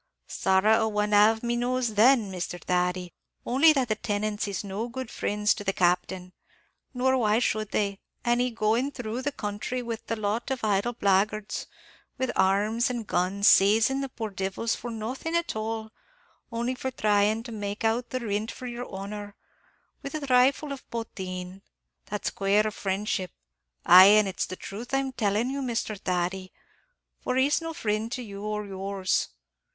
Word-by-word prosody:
"Sorra 190 +4 +3
a 220 - +1
one 210 0 0
av 220 +2 +5
me 240 0 0
knows 245 -1 0
then, 220 -1 +4
Misthur 175 -1 -4
Thady; 180 0 -1 0.3
only 275 +6 +5
that 270 -4 +1
the 215 - +1
tenants 210 -1 -2
is 200 -1 -3
no 200 +4 -4
good 260 0 -6
frinds 210 0 +1
to 205 - -7
the 195 -1 0
Captain; 180 +1 0 0.6
nor 260 0 +1
why 215 -2 +3
should 215 -3 0
they, 200 -1 -1 0.3
an' 240 0 +2
he 250 0 +2
going 230 +3 +1
through 245 -2 -4
the 290 +2 -1
counthry 210 +1 -4
with 230 -1 -6
a 230 - 0
lot 215 +3 -2
of 265 -3 -3
idle 210 +3 +1
blagguards, 205 +1 0 0.5
with 260 - -1
arms, 205 +5 +2
an' 240 -2 -3
guns, 195 +1 +1
sazin' 220 +7 +5
the 275 - -3
poor 225 -4 -5
divils 195 +4 -2
for 240 - -7
nothin' 245 +9 -4
at 340 -7 0
all, 220 0 -4 0.6
only 235 +2 -1
for 260 +1 -4
thryin' 215 -1 +2
to 235 - -8
make 205 -1 -5
out 225 +2 0
the 255 - -3
rint 210 0 -2
for 255 - -8
yer 245 0 -5
honor, 205 +1 -7 0.7
with 275 - -6
a - - -1
thrifle 270 +2 +3
of 270 - -11
potheen? 185 -5 -6 0.5
That's 210 0 -3
quare 205 +2 +2
friendship; 195 -2 -2 0.6
ay, 180 +2 +10
an' 210 +1 +6
it's 190 -1 -2
the 185 - -6
truth 230 +8 -6
I'm 270 -1 0
tellin' 220 +1 0
you, 280 0 -3
Misthur 235 -4 -2
Thady, 185 +1 -2 0.7
for 255 - -2
he's 280 +5 +3
no 330 0 -4
frind 220 -5 -2
to 250 - -4
you 200 -3 -8
or 210 0 -3
yours. 195 -1 -1
215 Hz, 170 wpm, -27 LUFS, 200-245 Hz, 0.7 s, ay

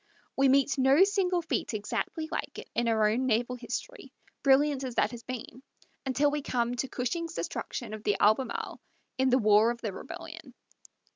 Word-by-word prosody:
We 270 0 +4
meet 275 +1 +3
no 270 +7 +6
single 370 -3 +1
feat 315 - -2
exactly 265 +9 -3
like - - -4
it - - -8
in 235 0 0
our 220 -2 +3
own 250 +4 0
naval 245 +1 +1
history, 245 - -6 0.3
brilliant 275 0 +3
as 255 -3 -5
that 215 - +2
has 240 -2 -8
been, 255 0 -7 0.5
until 280 +3 +2
we 295 0 -2
come 240 -3 -1
to 270 - -1
Cushing's 325 +8 -3
destruction - - -4
of 215 -1 -7
the 205 - +1
Albemarle 215 +4 +1 0.4
in 265 0 +3
the 255 - +4
war 215 -1 +5
of 240 0 -3
the 215 -4 -3
rebellion. 325 - -9
255 Hz, 180 wpm, -29 LUFS, 235-290 Hz, 0.5 s, no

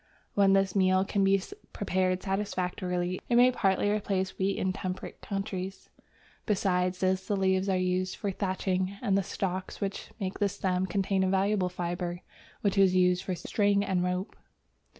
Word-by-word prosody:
When 195 -1 +4
this 195 -1 +2
meal 185 0 +3
can 195 0 +1
be 195 0 +4 0.3
prepared 185 -2 0
satisfactorily, 185 -2 -2
it 240 - +3
may 250 +1 +7
partly 195 -4 +1
replace 195 -2 -1
wheat 195 +1 +1
in 190 0 0
temperate 185 -1 -5
countries. 195 -1 -5 0.6
Besides 185 -3 +1
this, 190 0 +1
the 205 - 0
leaves 190 0 +2
are 190 - +2
used 185 0 0
for 200 - -2
thatching, 190 0 -1
and 200 -5 +2
the 195 - +3
stalks 190 -1 -4
which 195 -1 -4
make 190 -2 -3
the 205 -1 +2
stem 185 -1 -1
contain 195 0 +1
a 190 - +1
valuable 195 0 +2
fibre 175 0 -3 0.4
which 200 -1 +1
is 190 -1 +5
used 180 -1 +3
for 190 -1 -3
string 200 +2 +1
and 185 -3 0
rope. 180 +2 -2
190 Hz, 165 wpm, -29 LUFS, 185-195 Hz, 0.6 s, may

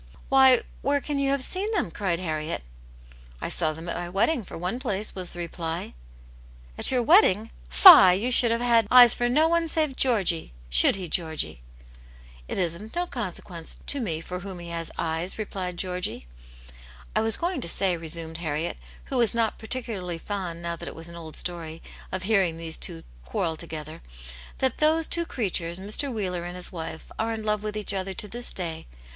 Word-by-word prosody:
"Why, 265 -2 +6 0.2
where 285 +2 +1
can 285 0 -3
you 275 0 +1
have 275 -1 +1
seen 390 +9 -2
them?" 190 - 0
cried 180 -1 -1
Harriet. 155 - -3 0.4
" - - -22 0.3
I - - -4
saw 155 - +1
them 160 +2 -8
at 170 - -3
my 175 0 -4
wedding, 220 - +1
for - - -9
one 180 +8 -3
place," 210 -3 -2
was 185 -2 -4
the - - -7
reply. 170 - -5 0.8
"At - - +2
your 255 -2 +1
wedding? 225 - +4 0.2
Fie, 250 - +10
you 230 +7 -1
should 240 -1 +7
have 230 +1 0
had 230 -3 +3
eyes 245 -2 +8
for 240 - 0
no 305 +6 +4
one 335 0 +1
save 310 -4 +1
Georgy. 195 - +1 0.2
Should - - +6
he, 185 -2 -3
Georgy?" 160 - -2 0.4
" - - -22
It - - -4
is 175 -4 0
of 210 +6 -11
no 350 +1 0
consequence 185 - -5
to 285 - 0
me 165 -8 -3
for 180 +2 -6
whom 190 0 -7
he 170 -1 -8
has 165 -1 -4
eyes," 165 +2 -2
replied 185 -4 -4
Georgy. 180 - -3 0.4
" - - -20
I - - +3
was 225 0 +2
going 345 -4 -2
to 170 - -2
say," 185 0 +3
resumed 165 0 -4
Harriet, 160 0 -3 0.3
who 265 - -3
was 235 -1 +2
not 230 -2 0
particularly 220 -7 -4
fond, 175 -2 -5
now 170 0 -2
that - - -8
it - - -7
was 165 +1 -7
an 170 - -10
old 160 -2 -8
story, 165 -2 -3 0.3
of 185 0 -4
hearing 190 -5 +2
these 165 -1 -5
two 80 - -3 0.2
quarrel 160 - -2
together, 155 -1 -7 0.6
"that 260 -2 -1
those 315 +1 +3
two 340 -1 -1
creatures, 175 -7 -2
Mr. 210 +8 0
Wheeler 185 -6 -3
and 175 +1 -6
his 180 -1 -4
wife, 160 -2 -7
are 225 +1 0
in 220 -1 -4
love 210 -1 0
with 215 0 -4
each 210 -1 -1
other 190 0 -3
to 210 - -1
this 240 +3 0
day. 165 -3 -5
185 Hz, 200 wpm, -26 LUFS, 165-235 Hz, 0.8 s, Fie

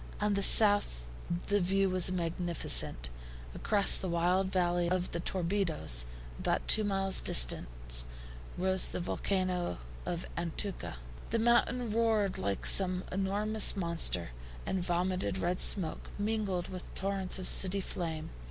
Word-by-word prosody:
On 210 0 0
the 200 - -1
south 205 - +6 0.4
the 205 0 0
view 195 +2 0
was 185 -1 +2
magnificent. 170 - +1 0.4
Across 205 -2 +1
the 185 - -5
wild 180 +3 0
valley 175 -2 0
of 185 0 -2
the 170 - -4
Torbido, 180 -1 -3 0.5
about - - -2
two 215 - +4
miles 195 -1 +1
distant, - - +1 0.5
rose 190 +1 +2
the - - -5
volcano 180 - -2 0.3
of 175 0 -5
Antuco. 175 +4 -5 0.4
The 230 - -1
mountain 235 0 +1
roared 220 -3 0
like 100 0 -3
some 185 -1 +3
enormous 205 +3 +2
monster, 170 - 0 0.4
and 185 -2 -3
vomited 180 +2 -2
red 180 0 -2
smoke, 170 -6 +1
mingled 205 -4 -2
with 185 -1 -9
torrents 195 -1 -1
of 185 - -6
sooty 195 +1 +2
flame. 165 -4 -5
185 Hz, 130 wpm, -30 LUFS, 170-200 Hz, 0.5 s, south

